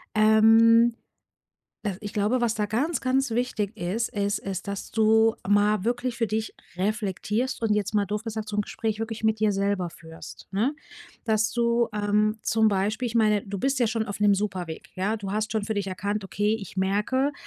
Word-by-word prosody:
ähm, 225 +2 +6 0.9
da 200 -4 -2
ich 205 - -6
glaube, 215 +5 +1
was 230 -2 +1
da 210 -2 -1
ganz, 260 +8 -1
ganz 265 0 +1
wichtig 225 -3 -1
ist, 200 +5 -2
ist 205 -1 -1
ist 195 0 -5
dass 200 -1 -5
du 220 0 +4
mal 205 0 +3
wirklich 240 +1 -1
für 230 - +1
dich 220 +1 -3 0.2
reflektierst 215 +5 -2
und 215 -2 +2
jetzt 210 0 -2
mal 205 -1 +3
doof 210 +1 -3
gesagt 220 -1 -5
so 210 - -3
'n - - +3
Gespräch 220 +1 -3
wirklich 225 0 -4
mit 220 -1 +2
dir 215 -1 +3
selber 195 -2 0
führst, 160 -1 -12
ne? 230 +9 0 0.5
Das 215 -1 +1
du, 235 0 +2
ähm, 210 +1 +1
zum 220 -1 +3
Beispiel 210 +5 0
ich 230 - -5
meine, 215 -3 +3
du 200 0 -4
bist 270 +5 0
ja 240 - +3
schon 220 0 -1
auf 200 0 -6
'nem 205 -1 +5
super 195 -3 -2
Weg, 160 -1 -9
ja? 195 +4 -1
Du 200 -3 -5
hast 215 +1 -1
schon 220 -2 -1
für 220 - -2
dich 200 -1 -2
erkannt: 200 +2 -3
„Okay, 205 +5 0
ich 195 -1 -10
merke, 210 +9 +1
215 Hz, 200 wpm, -26 LUFS, 205-225 Hz, 0.9 s, ähm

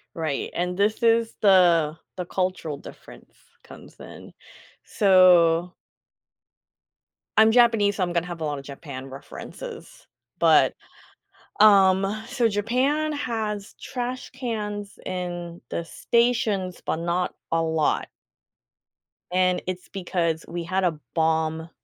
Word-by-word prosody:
Right, 155 -4 -2
and 180 +1 -1
this 210 +3 +1
is 230 0 +3
the 175 -6 +4 0.2
the 180 - -3
cultural 180 -5 -2
difference - - -14 0.3
comes - - -14
in - - -12 0.5
so 180 -3 +4 1.6
I'm 220 0 +7
Japanese, 225 -4 +4
so 185 - 0
I'm 175 -1 -2
gonna 170 0 0
have 175 -2 -7
a - - -1
lot 145 -2 -3
of 140 - -12
Japan 135 -2 -8
references, 455 - -10 0.3
but, - - +5 0.9
um, 200 0 +5
so 250 -3 +1
Japan 255 +9 0
has 220 -7 -4
trash 250 0 -5
cans 210 -5 -5
in 175 -2 -5
the 170 - -3
stations, 220 -4 0
but - - -1
not 170 +2 -2 0.2
a 165 0 +1
lot. 160 -1 0 1.2
And 185 0 +2
it's 185 0 -5
because 170 -4 -2
we 170 0 -5
had 185 +3 -1
a 165 -4 0
bomb 160 0 0
185 Hz, 120 wpm, -24 LUFS, 170-220 Hz, 1.6 s, I'm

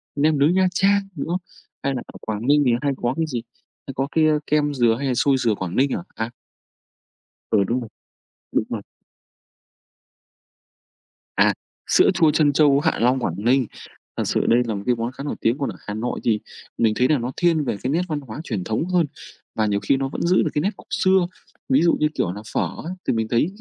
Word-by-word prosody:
nem 150 +1 +2
nướng 150 +5 +4
Nha 185 0 +4
Trang, 200 +2 +3
đúng 140 - -4
không? 175 +2 -1 0.4
Hay 140 - 0
là 125 - -3
ở - - -12
Quảng 110 +2 -4
Ninh 145 +1 +5
thì 125 - +4
hay 145 - +1
có 120 +1 -1
cái 165 - +1
gì? 125 -6 -3 0.5
Hay 135 - -5
có 135 +1 -1
cái, 160 -1 +3
a, 155 -1 +3
kem 150 -1 +2
dừa 120 -4 +3
hay 140 - -1
là 130 - +1
xôi 135 +2 +3
dừa 115 -4 +1
Quảng 95 -2 -5
Ninh 135 +1 +3
à? 85 - -3
À! 110 +1 -2 1.2
Ừ, 105 -3 +4
đúng 120 +6 0
rồi, 115 - -8 0.6
đúng - - +1
rồi. - - -3 2.5
À, - - +4 0.3
sữa - - +5
chua 160 -2 +4
trân 150 -2 +3
châu 140 -1 +5
Hạ 160 +2 0
Long, 125 +3 +3
Quảng 90 -9 -2
Ninh, 125 +5 +2 0.5
thật - - 0
sự - - +1
đây 120 +1 +5
là 110 - -1
một 100 - -5
cái 125 - +2
món 115 +1 -3
khá 135 - -8
nổi 145 - -3
tiếng. 115 +3 +2
Còn 140 -4 -2
ở 100 - -6
Hà 105 - -3
Nội 115 +3 -3
thì 110 -2 +2 0.4
mình 110 -2 +3
thấy 125 - +4
là 155 - +3
nó 125 +1 -3
thiên 165 -3 +2
về 120 - -2
cái 130 - 0
nét 165 +4 +2
văn 155 -3 -2
hóa 130 -1 -8
truyền 105 - -3
thống 110 - -1
hơn, 180 -2 +3 0.5
và 110 - +1
nhiều 100 -1 +1
khi 135 - +1
nó 135 0 -2
vẫn - - -5
giữ 180 +2 +3
được 155 - 0
cái 150 - +1
nét 190 - +1
cổ - - -13 0.2
xưa. 185 -2 +4 0.4
Ví 135 +3 +4
dụ 170 - +4
như 155 - +3
kiểu 90 - 0
là 105 - -7
phở - - +1 0.2
ấy, 175 - -5
thì - - +3
mình 110 -1 -1
thấy 120 +6 +2
135 Hz, 235 wpm, -22 LUFS, 115-155 Hz, 2.5 s, Ninh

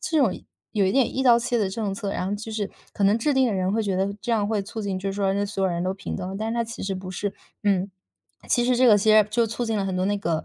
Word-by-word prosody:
这 320 - -1
种 235 -10 +3 0.4
有 200 -3 +2
一 - - +2
点 265 0 +2
一 265 - 0
刀 240 -2 +6
切 240 0 0
的 200 -3 +1
政 205 0 -3
策， 200 0 -4
然 180 - -2
后 200 - -1
就 220 +2 -6
是 210 -2 -3 0.2
可 200 - 0
能 205 +3 +4
制 285 +4 +1
定 265 -1 +4
的 225 - 0
人 185 -1 0
会 220 +2 +1
觉 195 -2 -1
得 195 +2 0
这 240 - -1
样 210 -2 +1
会 210 -3 0
促 220 +3 -6
进 195 -2 -2
就 195 +1 -3
是 - - -4
说 195 -1 0
让 205 0 0
所 195 -1 -3
有 190 - +2
人 170 +1 -2
都 185 - 0
平 190 -1 -6
等， 190 0 -5
但 220 +1 -2
是 230 - -2
它 235 0 0
其 225 0 -7
实 195 0 -2
不 185 0 -6
是， 195 +2 -3 0.3
嗯。 195 -1 +1 0.6
其 240 -2 +3
实 250 0 +2
这 255 +1 +5
个 210 -3 +7
其 215 +2 +3
实 215 -1 +6
就 230 +2 +2
促 225 +2 -3
进 225 -1 -1
了 200 - 0
很 190 -1 -2
多 185 - 0
那 205 +1 +1
个， 170 -5 -2
205 Hz, 350 characters per minute, -24 LUFS, 195-225 Hz, 0.6 s, 个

